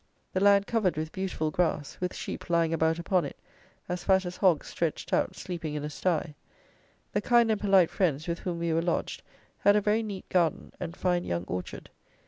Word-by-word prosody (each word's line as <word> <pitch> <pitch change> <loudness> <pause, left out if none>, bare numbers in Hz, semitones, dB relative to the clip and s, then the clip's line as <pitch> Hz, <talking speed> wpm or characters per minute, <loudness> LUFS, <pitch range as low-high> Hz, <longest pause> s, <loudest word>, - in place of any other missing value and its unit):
The 185 - +1
land 200 0 +5
covered 215 -8 +1
with 155 0 -3
beautiful 185 -5 -2
grass, 155 -3 0
with 180 0 -3
sheep - - -6
lying 165 -1 +2
about 160 0 +2
upon 175 +1 +1
it, - - -6 0.5
as 180 0 -3
fat 190 -1 +3
as 180 0 -5
hogs 180 -7 +3
stretched 165 -3 -3
out - - +1
sleeping 165 -4 -5
in 150 - -3
a 150 - -4
stye. 160 -1 -1 0.8
The - - +1
kind 235 -2 +4
and 215 - 0
polite 195 -4 +4
friends, 160 -5 0
with 170 0 -2
whom 175 -2 -3
we 170 -1 -1
were 165 - +2
lodged, 170 0 -2 0.4
had 205 - +5
a 210 - +4
very 210 +2 +2
neat 205 -4 -6
garden, 170 -4 +1
and 175 -1 -6
fine 180 -1 +1
young 85 0 -2
orchard. 90 0 -6
175 Hz, 200 wpm, -28 LUFS, 160-190 Hz, 0.8 s, land